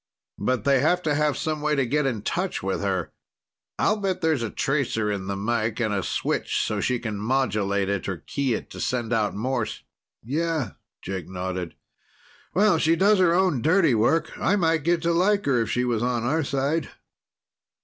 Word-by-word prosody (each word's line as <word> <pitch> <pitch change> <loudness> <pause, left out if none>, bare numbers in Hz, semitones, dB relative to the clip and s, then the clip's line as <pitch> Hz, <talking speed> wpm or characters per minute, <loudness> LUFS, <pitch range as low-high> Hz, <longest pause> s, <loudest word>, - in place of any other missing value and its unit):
But 125 -4 0
they 135 +1 +4
have 175 +6 +2
to 150 - +1
have 150 -1 +1
some 155 -1 -2
way 150 0 +1
to 135 -2 +1
get 145 +3 +1
in 115 -6 -2
touch 180 - -2
with 95 0 -1
her. 95 -4 -1 0.7
I'll 215 - +2
bet 195 -3 -2
there's 160 -6 +1
a 115 - -2
tracer 120 -7 0
in 95 -2 -4
the 100 - -2
mike 110 +2 -1
and 110 -3 0
a 100 - 0
switch - - -1
so 105 - -2
she 125 +3 +1
can 110 -4 -4
modulate 105 -5 0
it 100 -1 -2
or 95 - -3
key 135 - -1
it - - -7
to - - -8
send 120 -2 -1
out 105 -3 +1
Morse." 120 +1 -2 0.4
"Yeah," 150 - -1 0.3
Jake 95 -1 -5
nodded. 90 -2 -4 0.8
"Well, 200 -3 +4
she 160 +2 +3
does 200 +4 +4
her 170 -2 +4
own 180 -9 +2
dirty 160 - +4
work. 120 +9 +2
I 200 - +2
might 165 -4 +2
get 170 +1 +1
to 170 0 +2
like 200 +4 +2
her 125 -4 +2
if 115 - -2
she 125 0 0
was 120 -3 0
on 120 -1 0
our 155 +6 +1
side. 140 +3 -1
130 Hz, 195 wpm, -25 LUFS, 110-160 Hz, 0.8 s, they